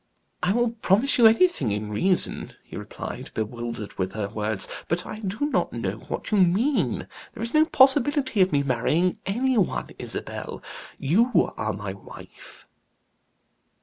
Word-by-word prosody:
"I 180 Hz, -, +1 dB
will 240 Hz, +2 st, +1 dB
promise 230 Hz, +5 st, +1 dB
you 230 Hz, -, +9 dB
anything 225 Hz, -, +3 dB
in 105 Hz, +1 st, -3 dB
reason," 180 Hz, -, +2 dB
he -, -, -12 dB
replied, -, -, -7 dB
bewildered 115 Hz, -1 st, -5 dB
with 95 Hz, 0 st, -2 dB
her 105 Hz, -2 st, -3 dB
words, 105 Hz, -1 st, -2 dB, 0.2 s
"but 175 Hz, +2 st, 0 dB
I 215 Hz, -, -7 dB
do 210 Hz, +6 st, -3 dB
not -, -, 0 dB
know -, -, -3 dB
what -, -, -6 dB
you 210 Hz, -, +3 dB
mean. 200 Hz, +11 st, +2 dB, 0.3 s
There -, -, -5 dB
is 230 Hz, -, -2 dB
no 310 Hz, 0 st, +5 dB
possibility 265 Hz, -4 st, +3 dB
of 185 Hz, -, +4 dB
my 140 Hz, -1 st, +2 dB
marrying 140 Hz, +8 st, 0 dB
any 245 Hz, +4 st, +1 dB
one, 185 Hz, -, -1 dB
Isabel; -, -, -4 dB, 0.3 s
you 220 Hz, -, +2 dB
are 110 Hz, -1 st, -2 dB
my 100 Hz, -1 st, -5 dB
wife." 100 Hz, -, -14 dB
185 Hz, 150 wpm, -25 LUFS, -, 0.3 s, you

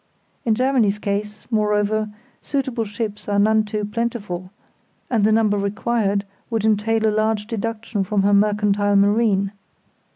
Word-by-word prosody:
In 225 Hz, -2 st, +3 dB
Germany's 245 Hz, -5 st, +2 dB
case, 210 Hz, +1 st, -3 dB
moreover, 210 Hz, 0 st, +1 dB, 0.3 s
suitable 260 Hz, -5 st, -2 dB
ships 210 Hz, 0 st, -5 dB
are 200 Hz, -, +1 dB
none 215 Hz, +2 st, +4 dB
too 210 Hz, 0 st, -3 dB
plentiful, 210 Hz, -5 st, -3 dB, 0.6 s
and 225 Hz, -4 st, +2 dB
the 215 Hz, -, +4 dB
number 215 Hz, -2 st, +3 dB
required 200 Hz, 0 st, 0 dB, 0.2 s
would 225 Hz, -2 st, -1 dB
entail 220 Hz, +1 st, +2 dB
a 215 Hz, -, +2 dB
large 215 Hz, -1 st, +1 dB
deduction 225 Hz, -1 st, -3 dB
from 195 Hz, +1 st, 0 dB
her 205 Hz, +1 st, +3 dB
mercantile 205 Hz, 0 st, +2 dB
marine. 200 Hz, -1 st, +3 dB
210 Hz, 135 wpm, -21 LUFS, 205-225 Hz, 0.6 s, none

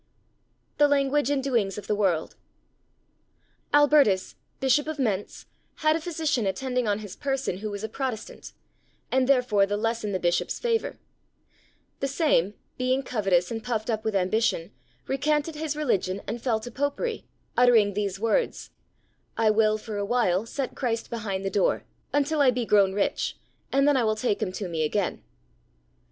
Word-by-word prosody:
The 295 Hz, -, +7 dB
Language 285 Hz, -1 st, +2 dB
and 280 Hz, -2 st, 0 dB
Doings 225 Hz, -8 st, 0 dB
of 205 Hz, -, -7 dB
the 210 Hz, -, 0 dB
World. 190 Hz, -6 st, 0 dB, 1.4 s
Albertus, 290 Hz, -10 st, +4 dB, 0.3 s
Bishop 270 Hz, +3 st, +2 dB
of 315 Hz, -1 st, -3 dB
Mentz, 210 Hz, -7 st, -2 dB, 0.3 s
had 310 Hz, 0 st, +2 dB
a 330 Hz, -, -2 dB
physician 305 Hz, -, -1 dB
attending 250 Hz, +4 st, -1 dB
on 205 Hz, -1 st, +1 dB
his 200 Hz, -, -9 dB
person 270 Hz, -8 st, -2 dB
who 215 Hz, +2 st, -4 dB
was 205 Hz, 0 st, -6 dB
a -, -, -1 dB
Protestant, 245 Hz, -1 st, -5 dB, 0.6 s
and 260 Hz, 0 st, +2 dB
therefore 245 Hz, -7 st, +3 dB
the 205 Hz, +1 st, -1 dB
less 225 Hz, +1 st, -1 dB
in 210 Hz, -, -2 dB
the 185 Hz, -, -1 dB
Bishop's 175 Hz, 0 st, 0 dB
favour; 460 Hz, -2 st, -1 dB, 1.0 s
the 275 Hz, -, 0 dB
same, 270 Hz, -, +1 dB, 0.2 s
being 255 Hz, +2 st, +1 dB
covetous 195 Hz, -7 st, +1 dB
and 225 Hz, -1 st, -4 dB
puffed 230 Hz, -1 st, -2 dB
up 220 Hz, -1 st, -2 dB
with 220 Hz, -2 st, -1 dB
ambition, 190 Hz, -2 st, +1 dB, 0.3 s
recanted 295 Hz, +3 st, 0 dB
his 305 Hz, -1 st, -3 dB
religion 200 Hz, -10 st, -1 dB
and 230 Hz, +3 st, -4 dB
fell 230 Hz, -4 st, +1 dB
to 245 Hz, -, -8 dB
Popery, 285 Hz, -, -2 dB, 0.3 s
uttering 230 Hz, -5 st, +5 dB
these 200 Hz, -1 st, -2 dB
words: 230 Hz, -, 0 dB, 0.7 s
"I 220 Hz, -1 st, +4 dB
will, 215 Hz, 0 st, +3 dB
for 215 Hz, -1 st, -6 dB
awhile, 205 Hz, -2 st, +1 dB
set 270 Hz, +2 st, -3 dB
Christ 230 Hz, -3 st, -2 dB
behind 200 Hz, -4 st, -3 dB
the 195 Hz, -, -1 dB
door, 195 Hz, -1 st, +1 dB, 0.3 s
until 290 Hz, +1 st, +1 dB
I 275 Hz, -, +6 dB
be 250 Hz, -1 st, 0 dB
grown 200 Hz, -3 st, +4 dB
rich, 200 Hz, 0 st, -1 dB, 0.3 s
and 275 Hz, +1 st, +3 dB
then 290 Hz, -, +4 dB
I 250 Hz, -, +2 dB
will 215 Hz, -1 st, +1 dB
take 215 Hz, -2 st, -1 dB
him 185 Hz, -, -1 dB
to 195 Hz, 0 st, -4 dB
me 165 Hz, -2 st, -3 dB
again." 180 Hz, +5 st, -1 dB
230 Hz, 165 wpm, -26 LUFS, 205-275 Hz, 1.4 s, The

